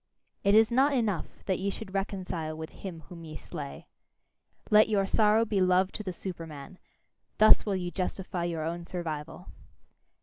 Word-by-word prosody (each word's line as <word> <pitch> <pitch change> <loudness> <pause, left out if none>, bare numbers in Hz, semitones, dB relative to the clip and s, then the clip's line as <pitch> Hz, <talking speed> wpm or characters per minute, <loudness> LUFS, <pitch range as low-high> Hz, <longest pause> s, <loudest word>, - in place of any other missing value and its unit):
It 200 +1 +4
is 220 +1 +6
not 270 +4 +4
enough 210 -9 -2
that 190 -2 0
ye 195 +2 -1
should 195 -1 -7
reconcile 180 -5 -3
with 160 0 -7
him 175 -5 -8
whom 170 +2 -11
ye 155 -1 -8
slay. 70 - -8 0.9
Let 215 +1 +7
your 200 -2 +2
sorrow 215 +2 +3
be 205 -3 0
love 185 +1 +3
to - - -5
the 195 -3 -4
Superman: 165 -2 -8 0.6
thus 215 0 +6
will 200 - +1
ye 180 -1 -3
justify 185 0 -3
your 165 -2 -2
own 170 +2 -3
survival! 165 -1 -6
185 Hz, 165 wpm, -29 LUFS, 165-205 Hz, 0.9 s, Let